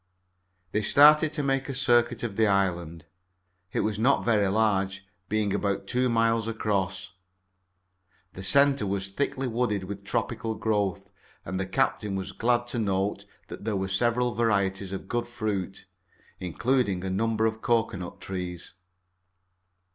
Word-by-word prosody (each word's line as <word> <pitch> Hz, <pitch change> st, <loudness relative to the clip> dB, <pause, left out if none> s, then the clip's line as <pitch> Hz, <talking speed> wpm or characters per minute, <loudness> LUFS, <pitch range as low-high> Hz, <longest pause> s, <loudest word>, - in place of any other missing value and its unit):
They 105 Hz, -, 0 dB
started 150 Hz, +7 st, +6 dB
to 150 Hz, -, -1 dB
make 135 Hz, 0 st, 0 dB
a 135 Hz, -, -3 dB
circuit 120 Hz, -3 st, +2 dB
of 110 Hz, -4 st, -3 dB
the 110 Hz, 0 st, +3 dB
island. 85 Hz, -5 st, 0 dB, 0.7 s
It -, -, 0 dB
was 110 Hz, -1 st, -1 dB
not 130 Hz, +5 st, +3 dB
very 105 Hz, -4 st, +3 dB
large, 100 Hz, -2 st, +1 dB, 0.2 s
being 105 Hz, -2 st, 0 dB
about 100 Hz, -1 st, -1 dB
two 125 Hz, +4 st, +1 dB
miles 115 Hz, -1 st, +2 dB
across. 95 Hz, -4 st, -2 dB, 1.2 s
The 95 Hz, -, -8 dB
center 140 Hz, +2 st, +3 dB
was 95 Hz, 0 st, -2 dB
thickly 135 Hz, +3 st, -1 dB
wooded 115 Hz, -4 st, -1 dB
with 100 Hz, +1 st, -7 dB
tropical 110 Hz, +2 st, -2 dB
growth, 100 Hz, -2 st, -1 dB, 0.3 s
and 95 Hz, 0 st, -3 dB
the 95 Hz, -, -2 dB
captain 105 Hz, -3 st, 0 dB
was 95 Hz, -1 st, -4 dB
glad 120 Hz, +1 st, +1 dB
to 120 Hz, -, -2 dB
note 100 Hz, -1 st, -1 dB, 0.2 s
that -, -, -9 dB
there 110 Hz, -1 st, -1 dB
were 95 Hz, 0 st, -2 dB
several 120 Hz, +5 st, +1 dB
varieties 100 Hz, -4 st, 0 dB
of 95 Hz, -1 st, -6 dB
good 120 Hz, +2 st, -2 dB
fruit, 105 Hz, -5 st, -4 dB, 0.5 s
including 100 Hz, +1 st, 0 dB
a 95 Hz, -, -2 dB
number 110 Hz, +3 st, +1 dB
of 110 Hz, 0 st, -1 dB
cocoanut 110 Hz, -7 st, -1 dB
trees. 90 Hz, -2 st, -5 dB
105 Hz, 145 wpm, -27 LUFS, 95-120 Hz, 1.2 s, started